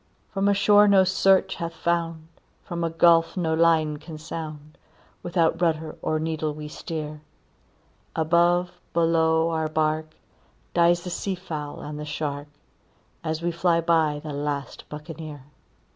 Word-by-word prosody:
"From 195 0 +1
a 200 - +4
shore 205 +1 +6
no 195 -2 +6
search 190 0 +3
hath 170 0 -5
found, 165 -2 -1 0.4
from 170 -1 -4
a 165 - +1
gulf 165 +1 +4
no 165 -3 0
line 160 -2 +3
can 155 +1 -9
sound, 155 -1 -8 0.4
Without 170 -1 +1
rudder 160 -2 0
or 155 - 0
needle 155 -1 -2
we 150 0 -7
steer; 150 -1 -6 0.9
Above, 175 +2 +3 0.2
below, 165 -1 +3
our 160 -1 0
bark, 155 0 -1 0.6
dies 170 0 +3
the 180 - -5
sea 190 +2 -2
fowl 155 -5 -6
and 150 0 -6
the 150 - -5
shark, 145 -1 -4 0.8
As 160 0 -3
we 175 - +1
fly 170 0 +2
by 160 -3 +2
the 150 -2 -5
last 145 -2 -4
Buccaneer. 150 -1 -8
160 Hz, 145 wpm, -25 LUFS, 155-170 Hz, 0.9 s, shore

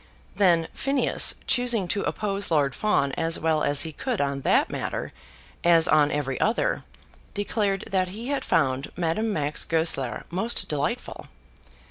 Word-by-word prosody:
Then 170 -5 +3
Phineas, 275 0 +2
choosing 240 -7 +2
to 200 - 0
oppose 200 -2 -2
Lord 145 -4 +2
Fawn 140 -9 +1
as 165 +4 -1
well 160 -1 +1
as 145 0 +2
he 160 - -5
could 240 - -3
on 140 -1 -1
that - - +2
matter, - - -4 0.5
as 170 -1 +5
on 150 -1 +4
every 135 -3 -2
other, 220 - +1 0.5
declared 205 -1 -1
that 185 -1 +1
he 220 +8 -7
had 285 -1 -1
found 135 -3 0
Madame 180 +6 0
Max 150 -5 -1
Goesler 160 -6 -1
most 225 +7 -1
delightful. 150 - -3
170 Hz, 145 wpm, -25 LUFS, 150-210 Hz, 0.5 s, as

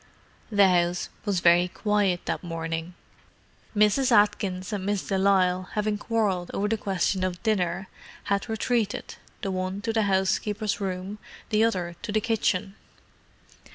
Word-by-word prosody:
The 200 -2 +6
house 175 -1 +1 0.2
was 195 -4 0
very 175 +1 +5
quiet 200 -2 0
that - - -2
morning. 165 0 -4 0.8
Mrs. 215 +5 +3
Atkins 205 -3 +2
and 200 -2 -2
Miss 200 0 -1
de 195 - 0
Lisle 185 -1 +2
having 210 -1 0
quarrelled 205 -6 0
over 205 - 0
the 225 - +1
question 190 -2 -1
of 180 -1 -3
dinner, 190 -4 0 0.4
had 200 +3 -1
retreated, 225 -1 -1 0.3
the 195 - -1
one 185 +1 -2
to 225 +1 -2
the 220 - +2
housekeeper's 205 +2 0
room, 190 +2 -4 0.3
the 215 -1 +3
other 180 -6 0
to 210 - -4
the 215 - +2
kitchen. 205 -4 0
195 Hz, 145 wpm, -26 LUFS, 180-210 Hz, 0.8 s, The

